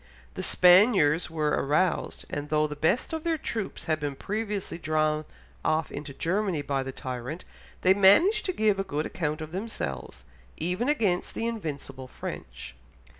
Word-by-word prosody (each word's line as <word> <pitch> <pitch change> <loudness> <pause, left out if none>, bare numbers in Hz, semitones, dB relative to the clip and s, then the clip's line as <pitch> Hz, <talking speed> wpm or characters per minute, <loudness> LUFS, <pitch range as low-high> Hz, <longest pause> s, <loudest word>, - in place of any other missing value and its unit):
The - - -5
Spaniards 180 -4 +5
were 155 -2 0
aroused, 150 +7 0
and 145 0 -5
though 155 0 +2
the 150 -1 -4
best 175 - +1
of 320 -1 -3
their 330 -1 +1
troops 225 -8 -4
had 155 -2 0
been 145 -2 -3
previously 205 +2 -3
drawn 155 -1 0 0.4
off 155 -1 0
into 145 0 -6
Germany 175 +1 -1
by 140 -1 -1
the 135 0 -4
tyrant, 130 +6 -6 0.4
they 185 - +6
managed 260 - +5
to - - +1
give 215 - +2
a - - +1
good 155 -5 -2
account 155 -2 -3
of 155 0 -6
themselves, 125 - -5 0.3
even 180 - -1
against 210 -12 0
the 230 - -2
invincible 145 - -5
French. 125 - -7
165 Hz, 160 wpm, -27 LUFS, 150-205 Hz, 0.4 s, they